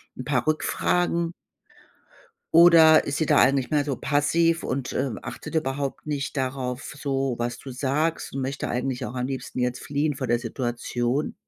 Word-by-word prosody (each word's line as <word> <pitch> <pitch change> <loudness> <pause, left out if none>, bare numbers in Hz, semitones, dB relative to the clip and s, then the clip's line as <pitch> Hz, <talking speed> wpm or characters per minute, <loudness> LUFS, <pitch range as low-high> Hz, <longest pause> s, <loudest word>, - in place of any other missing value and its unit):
'n 130 - -7
paar 130 -2 0
Rückfragen? 170 +2 0 1.2
Oder 165 -2 +8
ist 140 - -2
sie 160 - +1
da 150 - +4
eigentlich 135 +1 +3
mehr 145 -1 +2
so 140 -3 -3
passiv 165 +4 +1
und, 130 -2 -3
äh, 140 - 0
achtet - - -7
überhaupt 140 0 -2
nicht 145 0 -3
darauf 130 +1 -3
so 135 -2 -1
was 120 +1 -3
du 135 - -9
sagst 145 +6 -1
und 135 - -3
möchte 135 +1 -3
eigentlich 125 0 -2
auch 125 - -7
am 125 +1 -2
liebsten 130 -1 -5
jetzt 125 0 -1
fliehen 145 0 -1
vor 130 -3 -4
der 120 0 +2
Situation? 120 +2 -2
140 Hz, 165 wpm, -25 LUFS, 125-150 Hz, 1.2 s, Oder